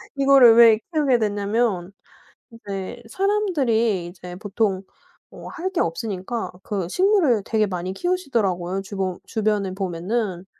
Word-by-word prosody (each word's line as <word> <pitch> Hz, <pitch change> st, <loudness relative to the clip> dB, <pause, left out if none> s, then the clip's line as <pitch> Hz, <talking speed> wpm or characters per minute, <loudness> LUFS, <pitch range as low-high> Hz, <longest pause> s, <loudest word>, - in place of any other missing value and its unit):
이거를 275 Hz, -4 st, +6 dB
왜 225 Hz, -2 st, +7 dB
키우게 280 Hz, -6 st, +2 dB
됐냐면 205 Hz, -2 st, -1 dB, 0.6 s
인제 205 Hz, 0 st, -7 dB
사람들이 265 Hz, -, 0 dB
이제 180 Hz, 0 st, -10 dB
보통 200 Hz, -1 st, -1 dB, 0.5 s
뭐 -, -, -11 dB
할 360 Hz, +1 st, -4 dB
게 370 Hz, -, -2 dB
없으니까 195 Hz, +6 st, -3 dB
그 195 Hz, -5 st, -3 dB
식물을 360 Hz, -, +2 dB
되게 215 Hz, -2 st, +1 dB
많이 185 Hz, 0 st, -4 dB
키우시더라고요 200 Hz, -, -1 dB
주보 190 Hz, -2 st, -4 dB
주변에 210 Hz, -3 st, -1 dB
보면은. 190 Hz, +1 st, -3 dB
215 Hz, 285 characters per minute, -22 LUFS, 190-245 Hz, 0.6 s, 왜